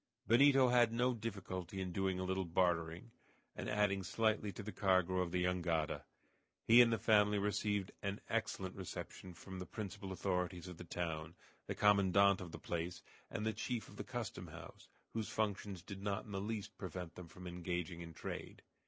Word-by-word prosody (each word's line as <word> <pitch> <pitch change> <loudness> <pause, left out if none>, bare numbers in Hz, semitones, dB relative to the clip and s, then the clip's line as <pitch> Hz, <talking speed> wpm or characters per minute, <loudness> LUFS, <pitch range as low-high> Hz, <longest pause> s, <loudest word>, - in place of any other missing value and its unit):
Benito 135 +2 +6
had 120 -2 +5
no 125 +2 +2
difficulty 95 -5 -4
in 95 -1 -2
doing 95 0 0
a - - -1
little 95 +1 0
bartering, 85 +3 0 0.4
and - - -4
adding 105 -2 +2
slightly 105 +2 +1
to 105 - -7
the 105 - -5
cargo 95 -3 +3
of 90 -1 +1
the 90 0 +1
jangada. 85 -3 0 0.6
He 115 +2 +9
and 120 -1 +6
the 115 - +3
family 105 -2 +4
received 105 -1 0
an 100 +1 -2
excellent 95 -4 -1
reception 95 -1 -7
from 95 +2 -8
the 90 - -6
principal 100 -2 -5
authorities 90 -2 -1
of 90 -2 -8
the - - -7
town, 80 -2 -3 0.3
the - - -2
commandant 100 -1 +5
of 90 -2 -7
the - - -6
place, 85 +1 -3 0.3
and 110 -1 -3
the 110 - +1
chief 115 +2 -3
of - - -13
the - - -3
custom - - -5
house, - - -11 0.3
whose 110 -2 -2
functions 100 -4 -2
did 95 0 -7
not 100 0 -1
in 105 - -10
the 95 -1 -2
least 105 0 -4
prevent 90 -3 -5
them 90 -2 -9
from 90 +2 -11
engaging 90 -1 -3
in 85 -1 -8
trade. - - -6
95 Hz, 185 wpm, -37 LUFS, 90-105 Hz, 0.6 s, He